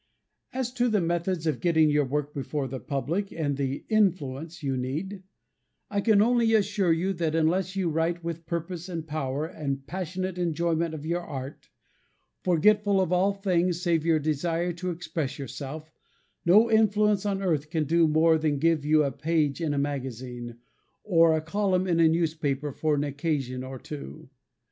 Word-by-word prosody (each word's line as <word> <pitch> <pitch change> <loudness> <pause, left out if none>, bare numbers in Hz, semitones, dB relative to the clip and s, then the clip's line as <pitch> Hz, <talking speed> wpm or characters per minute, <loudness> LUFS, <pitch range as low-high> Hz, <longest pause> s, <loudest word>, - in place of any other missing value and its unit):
As 255 -2 -3
to 245 -1 +1
the 215 -2 +2
methods 170 0 -1
of 155 -6 0
getting 160 -3 +3
your 145 -1 +2
work 145 +2 -2
before 140 0 -3
the 130 +1 -5
public 160 +9 -2
and 145 -4 -1
the 135 0 -3
"influence" 170 - 0
you 135 -2 0
need, 155 +10 -4 0.7
I 200 -1 0
can 210 -1 +4
only 235 -1 +3
assure 200 -3 +2
you 180 +4 +1
that 165 -3 -1
unless 175 +4 +1
you 190 -3 0
write 165 +2 -1
with 165 -1 -5
purpose, 170 +1 -4
and 165 -3 -4
power, 150 -2 -2
and 140 -5 -4
passionate 185 0 -4
enjoyment 170 -1 0
of 150 -1 -8
your 170 +2 -1
art, 140 -4 -8 0.7
forgetful 200 +3 +3
of 185 -2 0
all 185 +3 +3
things 180 -3 0
save 165 -3 +2
your 165 -1 +3
desire 165 +3 -1
to 180 +2 -4
express 160 -4 -4
yourself, 140 +4 -7 0.6
no 215 +6 +6
influence 210 -2 +3
on 195 -1 -1
earth 155 -5 0
can 160 -1 0
do 165 +2 +3
more 160 +1 +4
than 155 -2 0
give 160 0 +2
you 155 +1 +4
a 140 - 0
page 150 +2 0
in 160 -3 0
a 145 - -1
magazine, 125 -4 -4 0.5
or 165 -4 +4
a - - -2
column 185 +2 0
in 170 -3 +1
a 165 - +6
newspaper 155 -4 -1
for 155 +2 0
an 145 - 0
occasion 140 -3 -2
or 130 0 -7
two. 140 -1 -9
165 Hz, 170 wpm, -27 LUFS, 145-185 Hz, 0.7 s, no